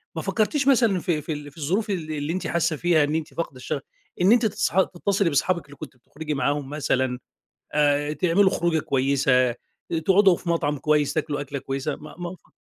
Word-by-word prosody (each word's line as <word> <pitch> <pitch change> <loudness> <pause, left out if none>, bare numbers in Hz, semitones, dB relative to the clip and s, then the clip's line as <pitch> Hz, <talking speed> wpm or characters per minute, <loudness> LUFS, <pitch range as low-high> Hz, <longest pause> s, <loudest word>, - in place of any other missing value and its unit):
ما - - -2
فكّرتيش 270 +6 0
مثلًا 230 -8 +4
في 160 -3 -1
في 155 +2 -4
ال 145 0 -8
في 140 - -24
الظروف 185 +9 -1
ال 165 -5 -3
اللي 150 +2 -2
أنتِ 185 - -3
حاسّة 170 -1 0
فيها 160 -1 +3
إن 150 +2 -1
أنتِ 160 -1 -3
فاقدة 165 -5 -4
الشغف، 140 +3 -4 0.4
إن 190 +4 +5
أنتِ 240 -1 +5
تصح 215 -3 +2
تتصلي 190 0 0
بصحابِك 170 +3 0
اللي 145 0 -14
كُنتِ 130 - -10
بتخرجي 150 +5 -6
معاهم 145 0 -1
مثلًا، 130 -4 -1 0.5
آآ 145 0 +2
تعملوا 185 +4 +3
خروجة 170 -2 +1
كويّسة، 130 -3 +2 0.5
تقعدوا 195 -1 +5
في 170 - -7
مطعم 150 -3 0
كويّس، 150 0 +1
تاكلوا 150 -2 -2
أكلة 140 0 -5
كويّسة 135 +2 -3
ما 150 -1 -12
ما 175 +1 -5
ف - - -28
155 Hz, 195 wpm, -24 LUFS, 145-180 Hz, 0.5 s, إن